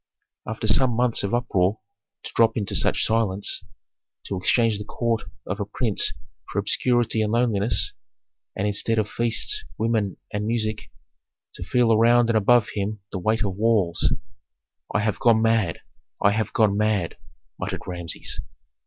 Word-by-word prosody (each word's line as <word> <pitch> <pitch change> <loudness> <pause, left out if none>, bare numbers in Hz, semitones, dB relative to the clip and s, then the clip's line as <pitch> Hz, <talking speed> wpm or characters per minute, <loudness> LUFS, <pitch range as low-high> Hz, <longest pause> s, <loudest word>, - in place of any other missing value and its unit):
After 110 0 -4
some 120 +3 +3
months 120 -1 +2
of 100 - -2
uproar 100 -4 +1 0.5
to - - -7
drop 115 0 +3
into 100 -3 -2
such - - +2
silence, 105 -3 0 0.6
to 100 - -4
exchange 110 +3 +2
the - - -4
court 115 +1 -2 0.2
of 100 +3 -4
a 100 - -1
prince 110 0 -1 0.4
for - - -6
obscurity 120 -3 +1
and 105 -1 0
loneliness, 115 -2 +1 0.6
and 100 - -1
instead 105 +2 +1
of 110 -1 +1
feasts, 120 - 0
women, 110 -4 0 0.2
and 105 +1 -2
music, 110 -2 -2 0.6
to - - -7
feel 115 +4 +3
around 120 +1 +4
and 110 - +3
above 115 +2 +4
him 105 +1 -3
the 95 - -3
weight 110 +5 +1
of 100 -3 -2
walls! 105 -6 +2 0.8
"I 105 - +1
have 105 0 -1
gone 115 -2 +4
mad! 115 -7 +1 0.4
I 100 - +4
have 110 +1 -1
gone 105 -3 +3
mad!" 105 -4 0 0.4
muttered - - -4
Rameses. 85 -2 -3
110 Hz, 155 wpm, -24 LUFS, 100-115 Hz, 0.8 s, around